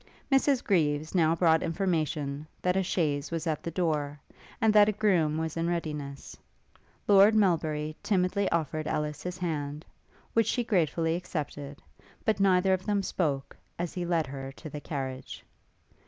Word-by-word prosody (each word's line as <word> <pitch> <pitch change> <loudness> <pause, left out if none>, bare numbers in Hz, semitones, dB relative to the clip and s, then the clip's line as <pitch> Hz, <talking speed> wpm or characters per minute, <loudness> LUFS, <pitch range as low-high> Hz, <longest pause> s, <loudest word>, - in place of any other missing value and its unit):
Mrs 270 -1 +3
Greaves 155 -5 +1
now 165 -3 +3
brought 160 -1 +4
information, 155 -5 -1 0.2
that 180 0 +2
a 190 - +3
chaise 150 -6 -1
was 165 -1 -3
at 155 -3 -1
the - - -4
door, 150 -4 -1 0.4
and 220 -1 +3
that 210 0 +7
a - - +3
groom 185 -8 +2
was 160 -1 -2
in 165 0 0
readiness. 150 -5 -4 0.7
Lord 205 +2 +7
Melbury 155 -6 +1
timidly 190 0 +1
offered 155 -1 -1
Ellis 150 -1 -2
his 180 0 -5
hand, 150 -3 -3 0.5
which 230 -2 +3
she 245 +1 +1
gracefully 165 -6 +1
accepted; 145 -5 -5 0.4
but 215 -2 +2
neither 190 -1 +4
of 185 0 -1
them 205 -1 0
spoke 145 -8 -2 0.2
as 175 -1 -3
he 180 - -3
led 170 -2 +1
her 135 0 -7
to 155 +2 -10
the 150 - -6
carriage. 130 -3 -5
165 Hz, 155 wpm, -29 LUFS, 150-185 Hz, 0.7 s, that